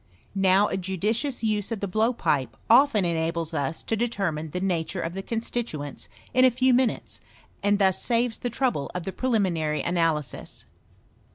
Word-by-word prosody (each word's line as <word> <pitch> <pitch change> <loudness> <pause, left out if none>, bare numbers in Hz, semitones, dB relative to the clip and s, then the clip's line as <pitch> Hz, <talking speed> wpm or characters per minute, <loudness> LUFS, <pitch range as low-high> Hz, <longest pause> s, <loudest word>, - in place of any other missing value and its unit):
Now 195 +1 +4
a - - -2
judicious 210 - -2
use 210 -1 0
of 225 - -2
the 200 - -2
blowpipe 215 - 0
often 235 -5 +5
enables 165 0 -1
us 145 0 -2
to 225 - -1
determine 195 -9 -1
the 180 - -3
nature 180 -1 -1
of 165 0 -3
the 195 - -4
constituents 225 - -4 0.2
in 255 - +5
a 260 - +8
few 255 +1 +2
minutes, 250 -1 0 0.4
and 205 0 +3
thus 190 -2 +2
saves 235 -1 +1
the 245 - -2
trouble 240 - -1
of 180 - -3
the 190 - -4
prelimi 220 -5 +1
nary 155 -2 -1
analysis. 165 -4 -2
195 Hz, 165 wpm, -26 LUFS, 165-235 Hz, 0.4 s, a